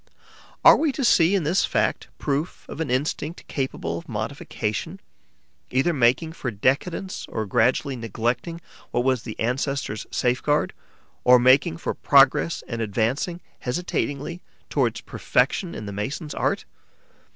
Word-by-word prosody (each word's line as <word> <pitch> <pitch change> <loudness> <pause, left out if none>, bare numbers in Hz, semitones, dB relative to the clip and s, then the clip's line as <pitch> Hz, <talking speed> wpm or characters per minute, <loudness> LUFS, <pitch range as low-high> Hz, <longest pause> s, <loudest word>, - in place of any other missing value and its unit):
Are - - +10
we 315 -2 +1
to 270 - -2
see 175 -3 +5
in 190 - +1
this 170 +6 +2
fact - - 0
proof 145 +4 -2
of 160 - -6
an 160 - -2
instinct 150 +5 -2
capable 85 - -3
of - - -15
modification, 115 - -4 0.7
either 135 +7 +2
making 135 +5 +2
for 130 - -4
decadence 140 - -1
and 110 -1 -2
gradually 125 +6 +2
neglecting 120 - -2 0.3
what 120 - 0
was 130 -2 +2
the 110 -2 -8
ancestors' 125 -1 -2
safeguard, 130 +4 +1 0.5
or 125 0 +8
making 135 +7 +4
for - - -3
progress 140 +4 +4
and 115 -1 -4
advancing, 115 - -1 0.2
hesitatingly, 145 +3 -3 0.3
towards - - +1
perfection 180 -4 0
in 110 - -6
the 100 - -6
mason's 140 +9 -4
art? - - -1
135 Hz, 135 wpm, -24 LUFS, 120-165 Hz, 0.7 s, Are